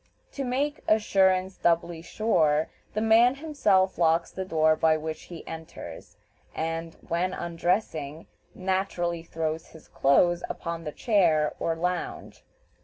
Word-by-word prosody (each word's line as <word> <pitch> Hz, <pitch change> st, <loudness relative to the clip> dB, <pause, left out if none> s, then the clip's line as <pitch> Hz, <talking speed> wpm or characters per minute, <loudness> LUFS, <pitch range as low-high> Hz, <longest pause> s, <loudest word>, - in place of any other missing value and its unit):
To 275 Hz, -, -4 dB
make 275 Hz, +4 st, -1 dB
"assurance 190 Hz, -3 st, +3 dB
doubly 170 Hz, -1 st, +1 dB
sure," 160 Hz, -6 st, +1 dB, 0.3 s
the 215 Hz, -, 0 dB
man 230 Hz, +3 st, +5 dB
himself 215 Hz, -, +1 dB
locks 165 Hz, 0 st, +2 dB
the 190 Hz, -, -4 dB
door 155 Hz, -3 st, +3 dB
by 160 Hz, 0 st, +3 dB
which 155 Hz, 0 st, -6 dB
he 170 Hz, -2 st, -9 dB
enters, 160 Hz, 0 st, -9 dB, 0.4 s
and, 165 Hz, +1 st, -3 dB
when 180 Hz, +2 st, -1 dB
undressing, 165 Hz, -3 st, -2 dB, 0.3 s
naturally 185 Hz, -3 st, -1 dB
throws 160 Hz, -1 st, -4 dB
his 160 Hz, -, -16 dB
clothes 175 Hz, +6 st, +3 dB
upon 170 Hz, -1 st, -5 dB
the 150 Hz, -, -3 dB
chair 165 Hz, -, +2 dB
or 165 Hz, -, 0 dB
lounge. 180 Hz, +2 st, -4 dB
170 Hz, 125 wpm, -27 LUFS, 160-190 Hz, 0.4 s, man